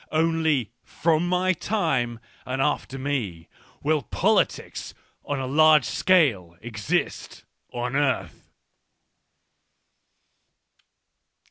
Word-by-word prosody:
Only 160 Hz, -7 st, +1 dB
from 165 Hz, +1 st, 0 dB
my 180 Hz, +1 st, +2 dB
time 135 Hz, -, -1 dB, 0.2 s
and 130 Hz, +1 st, -4 dB
after 135 Hz, -1 st, -1 dB
me 120 Hz, -12 st, -3 dB, 0.4 s
will 150 Hz, 0 st, +2 dB
politics -, -, -1 dB, 0.3 s
on 145 Hz, -1 st, -3 dB
a 130 Hz, -, -3 dB
large 155 Hz, +3 st, +5 dB
scale 120 Hz, -, +2 dB
exist 110 Hz, -2 st, -3 dB, 0.3 s
on 125 Hz, +2 st, -3 dB
earth. 130 Hz, -, -1 dB
140 Hz, 85 wpm, -25 LUFS, 120-160 Hz, 0.4 s, large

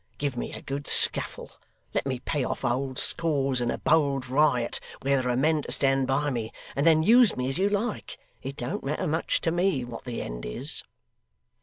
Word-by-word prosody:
Give 140 Hz, -3 st, -2 dB
me 120 Hz, -, -4 dB
a -, -, -9 dB
good 140 Hz, +1 st, -5 dB
scuffle; -, -, +4 dB, 0.4 s
let -, -, -1 dB
me 130 Hz, -2 st, -1 dB
pay 140 Hz, +3 st, -2 dB
off -, -, -3 dB
old 130 Hz, +2 st, -1 dB
scores 140 Hz, -6 st, +2 dB
in 120 Hz, -, -1 dB
a -, -, -2 dB
bold 140 Hz, -4 st, +1 dB
riot 130 Hz, -3 st, +1 dB, 0.2 s
where 135 Hz, 0 st, +2 dB
there 125 Hz, -, -2 dB
are -, -, 0 dB
men 155 Hz, +3 st, +2 dB
to -, -, -7 dB
stand 135 Hz, -1 st, +2 dB
by 145 Hz, +2 st, 0 dB
me; 115 Hz, -3 st, -4 dB, 0.2 s
and 140 Hz, +4 st, +1 dB
then 160 Hz, -1 st, +5 dB
use 235 Hz, +4 st, +5 dB
me 125 Hz, 0 st, -1 dB
as 135 Hz, -, -3 dB
you 200 Hz, +2 st, +2 dB
like 210 Hz, +2 st, -3 dB, 0.2 s
it 135 Hz, +1 st, -6 dB
don't 120 Hz, +1 st, -4 dB
matter 150 Hz, +6 st, -2 dB
much 160 Hz, 0 st, 0 dB
to 165 Hz, -, 0 dB
me 175 Hz, -7 st, 0 dB
what 120 Hz, -1 st, -9 dB
the 120 Hz, -2 st, -4 dB
end -, -, -7 dB
is! -, -, -3 dB
135 Hz, 205 wpm, -26 LUFS, 125-155 Hz, 0.4 s, then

